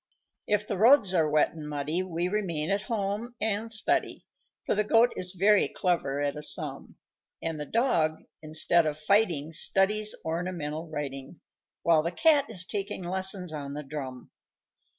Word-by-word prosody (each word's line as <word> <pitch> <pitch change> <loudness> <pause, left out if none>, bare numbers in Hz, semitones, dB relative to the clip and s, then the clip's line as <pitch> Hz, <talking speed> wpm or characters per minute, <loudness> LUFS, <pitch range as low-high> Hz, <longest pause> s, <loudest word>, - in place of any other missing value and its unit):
"] - - -26
_If 210 0 +1
the 200 -3 -4
roads 225 -4 +6
are 160 -4 +2
wet 150 0 +2
and 155 -2 -8
muddy 150 +4 -2
We 175 -1 -3
remain 180 -5 -2
at 200 0 0
home 220 +2 -3
and 220 +1 -2
study, 215 -1 +1 0.4
For - - 0
the 210 - +1
Goat 230 +3 +3
is 180 0 -1
very 205 +2 +4
clever 145 -6 -2
at 145 0 -1
a 150 - -7
sum, - - +2 0.4
And 165 -2 -4
the 150 - -5
Dog, 165 -10 0 0.2
instead 155 +1 +2
of 150 -1 -3
fighting, 165 -3 +1
Studies 205 +5 +2
ornamental 165 -1 -4
writing, 140 0 -7 0.4
While 165 -2 +4
the 170 +2 -3
Cat 290 - +3
is 185 -5 +1
taking 195 -1 -4
lessons 185 -1 0
on 140 -2 -6
the 150 - -6
drum. 135 -3 -8
175 Hz, 165 wpm, -27 LUFS, 155-205 Hz, 0.4 s, roads